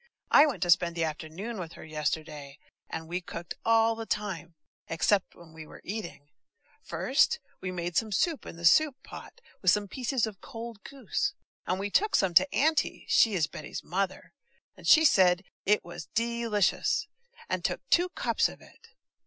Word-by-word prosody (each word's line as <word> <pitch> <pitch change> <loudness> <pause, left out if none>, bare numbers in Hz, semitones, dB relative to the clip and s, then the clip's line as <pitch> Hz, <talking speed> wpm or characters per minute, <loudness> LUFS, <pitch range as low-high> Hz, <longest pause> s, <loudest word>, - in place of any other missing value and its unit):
I 295 - +8
went 225 - -2
to 175 - +3
spend 170 0 +3
the 165 - 0
afternoon 160 +8 -5
with 170 -2 -6
her - - -11
yesterday, 150 -2 -4 0.3
and 160 0 -6
we 175 +2 -3
cooked 170 0 -7
all 225 0 +4
the 225 0 -7
time, 175 -6 -3 0.3
except 190 +4 +1
when 165 -2 -16
we 160 -1 -10
were - - -14
eating. 170 -8 -6 0.5
First, 475 - +1 0.2
we 185 - -3
made 175 -1 -4
soup 225 - 0
in - - -8
the 170 0 -6
soup 295 - +5
pot, - - -11 0.2
with 185 - +3
some 205 +2 +3
pieces 250 +3 -1
of 210 -4 -9
cold 230 -2 -8
goose, 275 -2 -3 0.3
and 185 - 0
we 200 +1 -3
took 420 - +2
some 190 -2 +2
to 275 +11 +5
Auntie 310 0 +1
(she 220 -3 +4
is 165 -4 +2
Betty's 150 - -8
mother), 190 +2 -3 0.4
and - - -10
she 320 0 +7
said 185 - +5 0.2
it 210 +1 +3
was 170 -4 -8
de 235 +1 0
licious, 205 -4 +1 0.4
and - - -2
took - - -2
two 355 +1 +4
cups - - 0
of - - -12
it. 460 - -19
195 Hz, 180 wpm, -29 LUFS, 170-230 Hz, 0.5 s, I